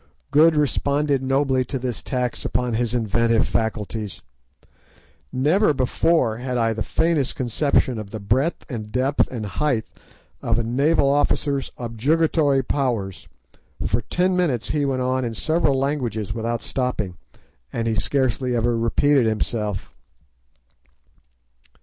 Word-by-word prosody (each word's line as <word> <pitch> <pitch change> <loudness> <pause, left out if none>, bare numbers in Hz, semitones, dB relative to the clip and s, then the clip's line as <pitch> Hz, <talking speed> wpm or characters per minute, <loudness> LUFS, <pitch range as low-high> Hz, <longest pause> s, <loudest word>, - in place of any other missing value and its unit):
Good 155 +3 +6
responded 145 -1 +1
nobly 135 0 +1
to 135 - -3
this 125 -3 -4
tax 125 -3 -2
upon 125 +1 -1
his 120 +1 0
inventive 115 0 +2
faculties. 110 -2 -3 1.1
Never 150 +6 +2
before 130 -2 +1
had 125 +1 -3
I 115 -1 +2
the 110 - -5
faintest 160 -3 +1
conception 130 -1 +1
of 105 -2 -7
the 110 - -6
breadth 130 +11 0
and 110 -6 -6
depth 130 +4 +1
and 115 -4 -5
height 120 +2 -1 0.6
of - - 0
a 120 - +1
naval 140 +6 +2
officer's 140 0 +1
objurgatory 140 +4 +1
powers. 120 -9 -2 0.6
For 115 +4 +1
ten 180 - 0
minutes 155 -11 0
he 150 -1 +1
went 130 -2 0
on 130 0 0
in 115 -2 -3
several 155 +1 +1
languages 120 -7 -1
without 115 +1 -2
stopping, 125 -8 -2 0.6
and 115 0 -2
he 115 - +1
scarcely 125 +4 0
ever 120 0 +1
repeated 120 +3 +3
himself. 105 -2 -2
125 Hz, 130 wpm, -22 LUFS, 115-140 Hz, 1.1 s, Good